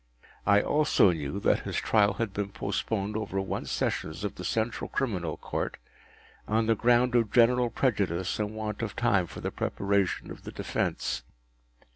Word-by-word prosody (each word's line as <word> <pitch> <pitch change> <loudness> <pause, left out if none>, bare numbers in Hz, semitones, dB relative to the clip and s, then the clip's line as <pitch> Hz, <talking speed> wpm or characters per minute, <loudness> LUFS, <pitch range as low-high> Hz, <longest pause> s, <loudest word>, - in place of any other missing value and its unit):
I 100 0 +6
also 150 -10 +4
knew 80 +2 -3
that - - +3
his - - -5
trial 105 -2 +3
had 105 -1 -3
been 100 -1 -2
postponed 105 0 -2
over 110 -3 -2
one 95 - -3
Sessions 80 +5 -2
of 105 - -2
the 90 - -8
Central 110 +5 -1
Criminal 90 - -2
Court, - - -3 0.7
on 110 +1 +2
the 115 - +4
ground 120 +2 +3
of 115 -4 +2
general 120 +1 +4
prejudice 100 -8 0
and 105 0 -2
want 110 -1 -4
of 110 -3 -3
time 100 -7 +2
for - - -9
the - - -2
preparation 100 -1 -1
of - - -9
the - - -7
defence. - - -2
105 Hz, 165 wpm, -28 LUFS, 95-115 Hz, 0.7 s, I